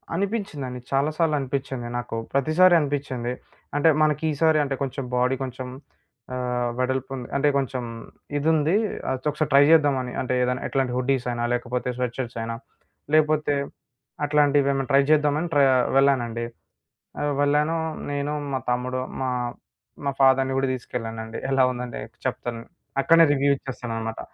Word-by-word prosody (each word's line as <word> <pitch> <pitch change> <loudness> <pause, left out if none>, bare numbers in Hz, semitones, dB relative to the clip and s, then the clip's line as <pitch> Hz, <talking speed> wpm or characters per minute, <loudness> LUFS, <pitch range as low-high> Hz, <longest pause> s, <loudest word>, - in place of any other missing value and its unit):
అనిపించిందండి. 175 - -3
చాలా 140 +2 +2
సార్లు 160 -3 +2
అనిపిచ్చింది 130 -2 -3
నాకు. 120 -1 -4 0.2
ప్రతిసారి 155 +7 +4
అనిపించింది. 135 -4 -2 0.4
అంటే 145 +3 +4
మనకీసారి 155 +1 +2
అంటే 135 -1 -2
కొంచెం 135 0 -3
బాడీ 125 +2 +2
కొంచెం 130 0 -6 0.7
ఆహ్, 125 -1 -1
వెడల్పుంది, 130 0 -2
అంటే 140 +1 +2
కొంచెం 135 -2 -1 0.5
ఇదుంది, 155 +2 +2 0.4
అయితే 130 +1 -4
ఒకసారి 150 0 -2
ట్రై 140 - +8
చేద్దాం 145 -4 +5
అని. 125 - -5
అంటే 130 0 -2
ఏదైనా 125 +1 0
ఎట్లాంటి 135 -2 0
హుడ్డీస్ 130 0 0
అయినా, 120 0 -2
లేకపోతే 125 +1 -2
స్వెట్ 125 -2 -2
షర్ట్స్ 120 -3 -4
అయినా, 115 0 -3 0.6
లేకపోతే 155 -1 +3 0.7
అట్లాంటివేమైనా 145 -2 +3
ట్రై 140 +1 +6
చేద్దామని 150 +2 +3
ట్ర 145 - +4 0.3
వెళ్ళానండి. 120 -4 +2 0.8
ఆహ్, 145 0 +1
వెళ్ళాను 150 +3 +2 0.3
నేను, 145 +1 -2 0.2
మా 130 - 0
తమ్ముడు, 125 +1 -1 0.2
మా 130 - 0 0.8
మా - - +3
ఫాదర్‌ని 135 0 +4
గూడా 135 0 +1
తీసుకెళ్ళానండి. 115 -2 -5
ఎలా 135 -1 +4
ఉందంటే 125 -1 -5 0.3
చెప్తాను. 120 -2 -3 0.4
అక్కడనే 165 +4 +6
రివ్యూ 140 0 +2
ఇచ్చేస్తానన్నమాట. 115 -4 -5
135 Hz, 135 wpm, -24 LUFS, 125-145 Hz, 0.8 s, ట్రై